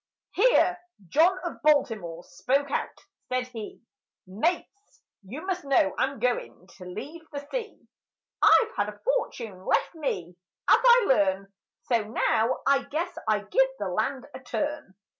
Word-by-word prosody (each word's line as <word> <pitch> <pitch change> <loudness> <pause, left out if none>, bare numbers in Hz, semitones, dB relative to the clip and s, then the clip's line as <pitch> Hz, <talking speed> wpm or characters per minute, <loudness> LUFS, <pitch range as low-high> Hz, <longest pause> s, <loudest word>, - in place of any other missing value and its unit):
Here 390 -5 +3 0.3
John 340 - +4
of 345 - -6
Baltimore 220 - +1
spoke 280 +2 -1
out: - - -3 0.2
said 255 0 0
he— 225 -2 -9 0.4
"Mates, 340 - -3 0.2
you 245 - -8
must 370 -3 -2
know 270 -9 +2
I'm 270 +1 -1
goin' 240 -6 -2
to 185 - -11
leave 290 - -8
the 285 -1 -7
sea; 470 -3 -4 0.6
I've 445 - +6
had - - 0
a - - -10
fortune 230 - -2
left - - +1
me, 180 - -4 0.3
as - - +6
I 485 -2 +6
learn, 195 -4 +1 0.3
So 235 -4 +1
now 225 +2 +1
I 275 0 +4
guess 340 +4 -3
I 215 -1 +2
give 265 +6 +2
the 200 -5 -3
land 245 +8 -2
a - - -8
turn. 290 -5 -4
265 Hz, 145 wpm, -27 LUFS, 210-325 Hz, 0.6 s, I've